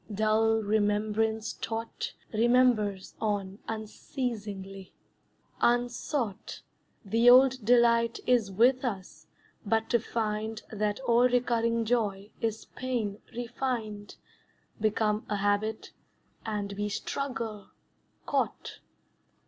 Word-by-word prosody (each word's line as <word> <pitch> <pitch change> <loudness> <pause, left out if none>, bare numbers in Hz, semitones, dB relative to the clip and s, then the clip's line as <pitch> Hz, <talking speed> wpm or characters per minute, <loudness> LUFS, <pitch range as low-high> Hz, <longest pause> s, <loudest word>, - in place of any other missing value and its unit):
Dull 220 +1 +2
remembrance 215 +1 0
taught 225 0 -5 0.2
Remembers 220 -4 +2
on 200 -2 -2
unceasingly; 210 -4 -5 0.7
unsought 240 -2 -1 0.4
The 230 +4 +4
old 260 0 +6
delight 235 0 +4
is 240 -5 +3
with 245 +7 +3
us 195 -7 -5 0.4
but 225 +1 0
to 235 - +4
find 220 -1 -3
That 210 0 -1
all 245 0 +4
recurring 230 -2 +1
joy 210 -4 -1
is 220 -1 -2
pain 230 -6 -3 0.2
refined, 235 -4 -4 0.6
Become 215 0 +1
a 210 - 0
habit, 205 +2 -1 0.6
and 205 -2 -3
we 205 +1 -2
struggle, 225 -3 -4 0.6
caught. - - -2
220 Hz, 90 wpm, -29 LUFS, 210-240 Hz, 0.7 s, old